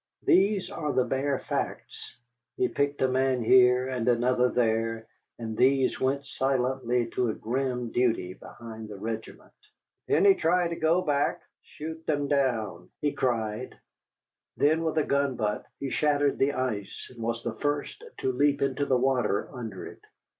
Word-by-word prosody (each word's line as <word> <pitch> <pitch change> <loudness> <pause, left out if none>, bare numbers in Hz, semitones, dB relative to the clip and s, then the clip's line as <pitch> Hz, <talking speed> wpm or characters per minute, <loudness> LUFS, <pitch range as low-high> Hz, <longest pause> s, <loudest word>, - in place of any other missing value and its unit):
These 195 +1 +3
are 150 -3 -2
the 130 - +3
bare 135 +2 0
facts. - - -5 0.4
He 380 - +2
picked 140 - -1
a - - +4
man 130 -1 +1
here, 125 +1 +5
and 125 -3 -3
another 125 +1 +3
there, 115 -1 0 0.3
and 110 -2 -5
these 130 +2 +2
went 140 +2 0
silently 130 -2 0
to 125 -2 0
a 110 - -2
grim 125 0 -2
duty 115 -7 +1
behind 110 +2 -10
the 105 - -8
regiment. 110 +2 -6 0.5
"If - - +2
any 400 0 +6
try 175 - +1
to 170 - -3
go 165 +3 +2
back, 145 -1 +1 0.2
shoot 160 +1 -8
them 145 -2 0
down!" 115 -11 -1
he 145 - 0
cried. 115 -2 -2 0.8
Then 155 +3 +3
with 160 -1 -1
a 155 - +4
gun 140 -2 +1
butt 105 -3 -2
he 140 - -4
shattered 145 -2 +1
the 140 +1 +2
ice 120 -7 -4
and 120 - -11
was 115 +1 -2
the 120 - -3
first 145 - -3 0.2
to 130 - +1
leap 140 +2 +2
into 140 +1 0
the 130 - +3
water 125 -5 +1
under 115 -7 -6
it. - - -11
130 Hz, 160 wpm, -27 LUFS, 115-145 Hz, 0.8 s, any